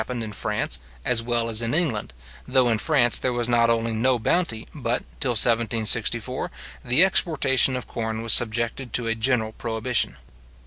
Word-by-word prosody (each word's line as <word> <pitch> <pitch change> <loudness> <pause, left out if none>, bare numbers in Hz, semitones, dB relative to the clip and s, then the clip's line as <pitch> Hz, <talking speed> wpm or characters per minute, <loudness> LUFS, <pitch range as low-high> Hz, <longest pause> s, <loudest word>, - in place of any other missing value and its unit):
It - - -6
has - - -25
happened 125 -2 -5
in 110 - -7
France, 65 -8 -3 0.3
as 120 -2 +2
well 115 0 -2
as 115 0 0
in 115 +4 -2
England, 145 - -1 0.4
though 130 -2 +2
in 110 -2 -1
France 130 -6 +2
there 130 - -2
was 120 -1 -2
not 120 -1 +1
only 115 0 -1
no 125 +3 +1
bounty, 115 -1 -2
but, 125 -5 -3 0.2
till 125 -4 -1
1764, 115 +1 +3 0.3
the 125 +8 +4
exportation 135 -8 +2
of 125 - -6
corn 110 -1 -6
was 115 - +5
subjected 115 +2 +1
to 120 - -1
a 115 - -1
general 115 -1 -1
prohibition. 115 +2 -3
120 Hz, 180 wpm, -22 LUFS, 115-125 Hz, 0.4 s, was